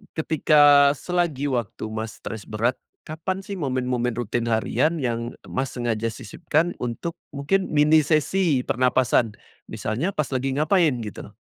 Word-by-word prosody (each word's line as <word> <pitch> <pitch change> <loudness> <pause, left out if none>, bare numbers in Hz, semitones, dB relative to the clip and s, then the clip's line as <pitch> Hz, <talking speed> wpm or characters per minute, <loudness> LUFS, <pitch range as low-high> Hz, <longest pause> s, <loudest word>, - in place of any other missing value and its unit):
ketika 145 -2 +5
selagi 155 -5 -1
waktu 120 -5 -3
Mas 110 0 -5
stres 110 -2 -7
berat, 115 +4 0 0.3
kapan 180 +5 -4
sih 195 0 -7
momen-momen 125 -4 -1
rutin 120 0 -2
harian 125 +8 +1
yang 120 -1 -2 0.2
Mas 130 -1 -2
sengaja 115 -2 -1
sisipkan 165 +6 -2
untuk 160 +8 -4 0.2
mungkin 175 +7 0
mini 150 +1 +5
sesi 155 -1 +2
pernapasan, 125 -3 +1 0.3
misalnya 145 - -3
pas 150 -3 -1
lagi 135 0 -1
ngapain 155 0 +3
gitu? 105 -1 -8
135 Hz, 130 wpm, -24 LUFS, 120-155 Hz, 0.3 s, ketika